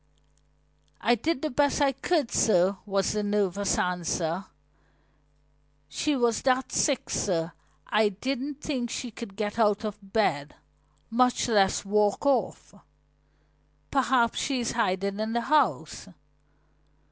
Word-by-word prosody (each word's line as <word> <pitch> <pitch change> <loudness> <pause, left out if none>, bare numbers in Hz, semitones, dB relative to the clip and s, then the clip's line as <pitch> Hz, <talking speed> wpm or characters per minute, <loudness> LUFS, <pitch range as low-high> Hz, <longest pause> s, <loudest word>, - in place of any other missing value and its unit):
"I 235 +4 +3
did 290 +6 -1
the 310 - -1
best 285 +3 +1
I 280 -1 +3
could, 290 0 -1
sir," 190 -2 +3
was 195 -1 0
the 210 - -1
nervous 205 -1 0
answer. 180 0 -1 1.4
"She 300 - -1
was 240 -3 +1
that 260 0 +1
sick, 280 -4 +1
sir, 170 -3 -1 0.3
I 210 0 +2
didn't 270 +7 -4
think 255 -6 -3
she 245 +1 -5
could 210 -3 -9
get 210 +2 -3
out 210 -1 +3
of 210 -1 -5
bed, 195 -8 -1 0.6
much 250 +2 +2
less 200 -4 +2
walk 210 +4 +1
off." 280 -2 0 1.2
"Perhaps 250 -4 +2
she 270 -2 -1
is 235 - -1
hiding 200 -2 -1
in 220 +1 -2
the 235 - +1
house." 295 +5 0
220 Hz, 125 wpm, -27 LUFS, 200-260 Hz, 1.4 s, I